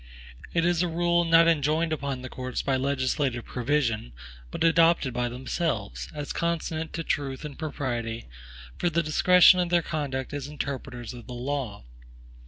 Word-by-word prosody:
It 165 -1 +1
is 175 -1 +2
a 180 - +2
rule 175 +1 +2
not 165 0 +6
enjoined 160 +1 +2
upon 140 -3 -3
the - - -5
courts 125 -1 -4
by 135 - +1
legislative 130 -2 0
provision, 120 - -1 0.4
but - - -3
adopted 165 -5 +4
by 120 0 -1
themselves, 125 - -3
as 145 -1 -5
consonant 165 -1 -2
to 165 - -3
truth 140 -2 -2
and 150 - -7
propriety, 120 -7 -3 0.5
for 175 - +2
the 170 0 +1
direction 180 +4 +6
of 175 -1 +1
their 175 -1 +3
conduct 140 -4 -3
as 145 -1 -4
interpreters 135 -4 -5
of 120 -2 -11
the 125 - -7
law. 125 - -4
145 Hz, 160 wpm, -27 LUFS, 130-165 Hz, 0.5 s, not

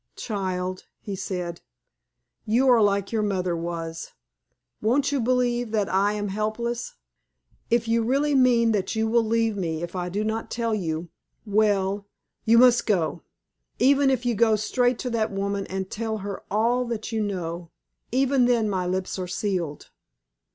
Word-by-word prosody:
"Child," 185 -3 -3
he 200 - -5
said, 180 -3 -4 0.8
"you 235 +5 +2
are 240 -3 +6
like 200 -1 +1
your 225 -2 +1
mother 185 -4 0
was. 165 -1 -5 0.7
Won't 265 +6 +2
you 280 -3 0
believe 245 -1 +1
that 210 -3 +1
I 200 +2 +3
am 205 -1 -3
helpless? 235 +4 -3 0.7
If 235 -1 +2
you 230 0 +2
really 275 +6 +1
mean 245 -3 +4
that 205 0 -1
you 220 0 +1
will 230 +1 +3
leave 225 -1 +1
me 165 -4 -3
if 175 +2 -6
I 180 -1 -2
do 205 +4 -2
not 220 +1 -2
tell 230 -1 -1
you, 170 -4 -2 0.4
well, 205 -1 +1 0.4
you 230 +1 +5
must 245 0 +5
go. 175 -5 0 0.6
Even 275 +1 +4
if 255 -2 0
you 240 - +2
go 220 0 +4
straight 245 +3 +1
to 250 - -3
that 220 -2 0
woman 200 0 -2
and 190 0 -3
tell 220 0 -2
her 200 -1 -5
all 235 +5 +2
that 230 -2 -4
you 220 -1 -1
know 175 -4 -4 0.4
even 265 0 +3
then 235 -3 +2
my 185 -2 -1
lips 185 +1 -2
are 180 - -3
sealed. 180 -5 -3
215 Hz, 165 wpm, -25 LUFS, 190-235 Hz, 0.8 s, are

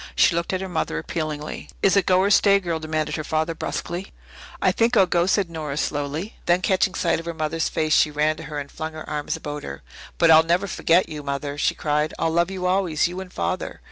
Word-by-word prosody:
She - - +5
looked 170 0 -1
at 185 0 -1
her 190 - -4
mother 160 - -2
appealingly. 150 - -4
"Is 195 - +4
it 200 -3 +2
go 185 0 +4
or 200 +1 +2
stay, 200 0 +5
girl," 170 -4 -3
demanded 155 -1 -2
her 155 - -3
father 160 +2 -1
brusquely. 175 +3 -4 0.5
"I - - +3
think 235 +1 +2
I'll 195 - +7
go," 175 0 +1
said 195 -1 +2
Nora 155 -4 -5
slowly. 150 +7 -3
Then, 175 +2 +3
catching 190 0 +2
sight 170 -2 +1
of 165 - -9
her 170 - -4
mother's 160 +1 -1
face, 155 -1 0
she - - +5
ran 150 +1 +1
to 160 - -8
her 150 - -6
and 140 -1 -5
flung 160 0 -5
her 155 - -8
arms 150 -1 -2
about 145 0 -6
her. - - -8 0.3
"But 170 -1 +5
I'll 160 0 +9
never 170 +4 +1
forget 175 -1 +2
you, 150 -1 -6
Mother," 140 0 -3
she 145 - +1
cried. 150 0 -1
"I'll 165 - 0
love 170 +1 +2
you 185 -1 -4
always 180 -5 +2
you 180 +2 -6
and 185 -1 -10
Father." 185 - -3
165 Hz, 235 wpm, -23 LUFS, 155-185 Hz, 0.5 s, I'll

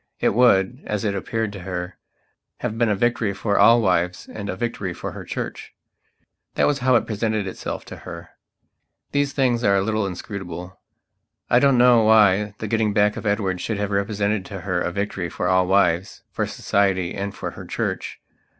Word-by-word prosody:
It - - +2
would, 120 +1 +3
as 105 +1 -2
it 100 - +1
appeared 110 +2 -2
to 100 - -7
her, 90 0 -5 0.6
have 120 -3 -2
been 115 -1 +2
a 105 - +2
victory 115 -1 0
for 100 0 0
all 115 0 +6
wives 90 -2 0
and 105 -1 -7
a - - -2
victory 95 -4 -3
for - - -5
her - - -8
Church. - - -6 0.8
That - - +3
was 145 -1 +1
how 130 0 +3
it 115 - +3
presented 110 -1 -1
itself 95 - -5
to - - -9
her. 85 -2 -10 0.8
These 145 0 0
things 125 -4 +1
are 100 -2 +4
a 95 - +2
little 110 -1 0
inscrutable. 90 -1 -7 0.7
I 120 - +6
don't 135 -1 +4
know 120 -1 +6
why 105 -2 +4
the 110 - -5
getting 110 -1 +1
back 105 0 +3
of - - -5
Edward 100 -3 0
should 110 - -2
have 105 0 -2
represented 100 0 0
to 95 0 -7
her 90 -1 -1
a 90 - -1
victory 95 -2 -3
for 90 - -3
all 95 0 +3
wives, 95 -2 +1
for - - -2
Society 95 -3 0
and 100 0 -4
for - - -5
her - - -10
Church. - - -3
100 Hz, 190 wpm, -22 LUFS, 95-110 Hz, 0.8 s, all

